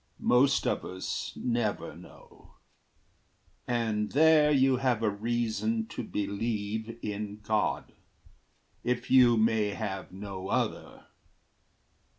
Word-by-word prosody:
Most 130 +3 +3
of - - 0
us 95 0 -4
never 120 -4 -2
know - - -16 1.1
And 110 -3 -1
there 155 +1 +6
you 135 -2 +4
have 125 -3 0
a 110 - +3
reason 110 0 -1
to 120 - -5
believe 110 +2 -3
In 105 0 -4
God, 105 0 -1 0.9
if 125 0 -2
you 125 -3 +6
may 110 -1 +2
have 95 -4 -5
no 95 -1 -7
other. - - -2
110 Hz, 105 wpm, -29 LUFS, 105-120 Hz, 1.1 s, there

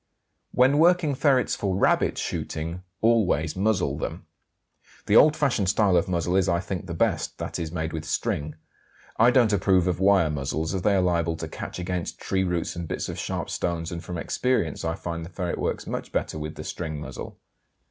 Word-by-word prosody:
WHEN 135 +4 +4
WORKING 170 -3 +4
FERRETS 135 -2 +2
FOR 95 -2 -1
RABBIT - - +2
SHOOTING 85 +3 -4 0.2
always 95 -9 +2
muzzle 100 0 +1
them. - - -5 0.8
The - - +2
old 155 0 +7
fashioned 120 -11 +1
style 100 -2 +3
of 85 +3 +2
muzzle 90 0 0
is, 95 0 +2
I 85 -1 +2
think, 95 0 -5
the 85 - -4
best, - - 0
that - - -4
is, 80 -2 -4
made 80 -1 -3
with 80 -1 -4
string. 75 -1 -2 0.6
I 115 +2 +7
don't 120 -4 +4
approve 95 -2 +3
of 90 -2 0
wire 95 -5 +4
muzzles, 75 +3 -2
as 95 - -1
they 100 +2 +3
are 95 - +3
liable 85 -2 +1
to - - -5
catch - - -7
against 90 -1 -3
tree 95 0 0
roots 90 -2 -2
and 85 -1 -5
bits - - -3
of - - -5
sharp - - -3
stones, 85 -1 -2
and 85 0 -5
from 90 - -5
experience 105 - -1
I 80 0 -1
find 85 -1 -5
the 85 - -8
ferret 90 -1 -3
works - - -2
much - - -5
better 80 - -2
with 75 0 -5
the - - -7
string 80 -3 -5
muzzle. 65 -4 -8
90 Hz, 200 wpm, -25 LUFS, 80-100 Hz, 0.8 s, old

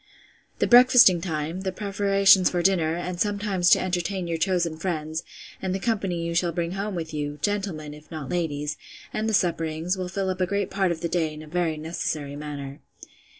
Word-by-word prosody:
The - - +2
breakfasting 245 -7 +7
time, 165 +1 -3
the 190 -1 -2
preparations 195 -1 +4
for 175 -1 -1
dinner, 170 -4 +2
and 175 0 -4
sometimes 200 -3 +1
to - - +6
entertain 185 +1 -2
your 165 -1 -2
chosen 175 -2 +1
friends, 160 -2 -3 0.4
and 190 -1 -2
the - - -2
company 195 -6 -1
you 170 - -2
shall 170 0 +1
bring 170 0 -2
home 195 +1 -3
with 160 -2 -5
you, 145 -1 -3
gentlemen, 190 -8 -2
if 150 +1 -14
not 155 -5 -6
ladies, 155 -4 -2 0.4
and 220 +1 -1
the - - -2
supperings, 165 +1 0
will 180 -1 -3
fill 190 0 -1
up 185 0 -5
a 185 - +2
great 200 0 -1
part 190 -2 +1
of 160 -1 -4
the 170 - 0
day 165 -2 0
in 155 0 -9
a - - -12
very 165 -1 -1
necessary 155 -2 -4
manner. 145 -2 -7
175 Hz, 195 wpm, -25 LUFS, 160-195 Hz, 0.4 s, breakfasting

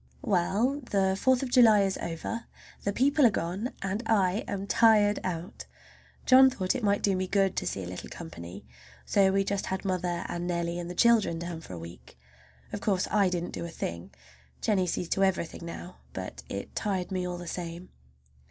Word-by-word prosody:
Well, 220 +5 +1
the 190 -1 +2
Fourth 260 +6 +2
of 255 - -4
July 220 -5 +6
is 195 -1 0
over! 170 +8 -4 0.4
The 200 - +2
people 280 +7 +3
are 240 - +8
gone 195 +4 -2
and 195 +3 -2
I 200 -1 +2
am 200 -1 -3
tired 210 -1 +4
out. 175 +2 -5 0.6
John 260 +1 +8
thought 190 -8 -1
it 255 - -4
might 200 -1 +2
do 195 -2 +3
me 185 0 -1
good 195 -1 +2
to - - -1
see 95 - -3
a - - -6
little 90 0 -7
company, 90 - -9 0.4
so 195 -2 +3
we 195 0 +2
just 200 0 -2
had 190 +1 -3
mother 180 -2 -1
and 175 0 -4
Nellie 170 0 -1
and 175 0 -5
the 180 - -6
children 230 -7 +4
down 170 -1 -5
for 95 - -10
a - - -6
week. 85 -4 -11 0.6
Of - - -4
course 190 -3 +1
I 200 -3 +4
didn't 175 -1 -3
do - - -4
a 170 - -5
thing. 85 - -5 0.5
Jennie 190 -4 +1
sees 175 0 -2
to 195 - +2
everything 175 -3 -1
now. 175 +2 -8 0.2
But - - -6
it - - -6
tired 195 -3 -2
me 185 -1 -1
all 180 0 -4
the 175 - -8
same. 175 +1 -6
190 Hz, 200 wpm, -28 LUFS, 175-205 Hz, 0.6 s, are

